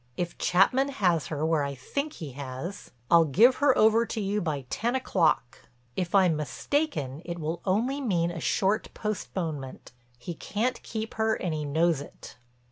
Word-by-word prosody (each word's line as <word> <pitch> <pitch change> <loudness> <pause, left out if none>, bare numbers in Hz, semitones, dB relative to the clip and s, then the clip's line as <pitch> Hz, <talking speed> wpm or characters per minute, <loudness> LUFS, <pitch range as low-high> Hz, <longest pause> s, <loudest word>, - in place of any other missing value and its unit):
If 175 -1 -3
Chapman 250 +10 +3
has 175 - +1
her 150 +2 -2
where 160 -2 +2
I 140 0 -3
think 280 - -3
he 155 - -7
has, 135 +8 -7 0.2
I'll 170 -1 +7
give 225 - +5
her 285 -2 +4
over 220 +1 +5
to 225 - -3
you 205 +1 -1
by 150 -6 -2
ten 240 +3 0
o'clock. 170 - 0 0.3
If 180 0 -1
I'm 185 -4 +5
mistaken 150 - -2
it 170 0 -5
will 160 +1 -3
only 235 +9 +1
mean 175 -9 +1
a 170 - -6
short 195 +6 0
postponement. 165 - -4 0.3
He 125 +8 -6
can't 225 +9 -2
keep 220 -1 -5
her 220 0 +3
and 175 -3 -3
he 150 -1 -3
knows 160 +1 +2
it." 145 - -12
175 Hz, 170 wpm, -27 LUFS, 155-220 Hz, 0.3 s, I'll